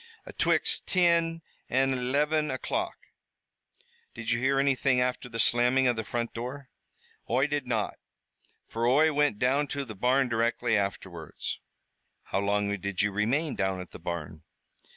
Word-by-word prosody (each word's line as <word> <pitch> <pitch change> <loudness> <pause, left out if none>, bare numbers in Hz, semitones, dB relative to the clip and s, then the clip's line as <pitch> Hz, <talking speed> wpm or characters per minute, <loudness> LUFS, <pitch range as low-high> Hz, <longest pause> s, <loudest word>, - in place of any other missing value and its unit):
"Atwixt - - +1
tin 170 -2 +2 0.3
an' 135 +1 +2
eliven 150 +5 +1
o'clock." 130 - -2 1.2
"Did 115 0 -3
you 115 - +2
hear 135 +2 +2
anything 135 -1 +2
after 125 0 -1
the 115 - -6
slamming 125 +3 +4
of 120 - +2
the 110 - -3
front 115 +1 -3
door?" 125 +3 -6 0.6
"Oi 130 +4 +3
did 145 -3 -2
not, 115 -4 -1 0.7
fer 115 +1 -1
Oi 150 +5 +4
wint 145 -7 +2
down 135 +5 +2
to 140 -1 -3
the 110 - -7
barn 125 +6 +2
directly 115 0 +1
afterwards." 95 -5 -3 0.6
"How - - -2
long 100 0 0
did 100 0 -1
you 105 - +1
remain 130 +10 0
down 95 -1 -1
at 90 - -8
the - - -10
barn?" 80 -2 -5
125 Hz, 150 wpm, -28 LUFS, 105-140 Hz, 1.2 s, slamming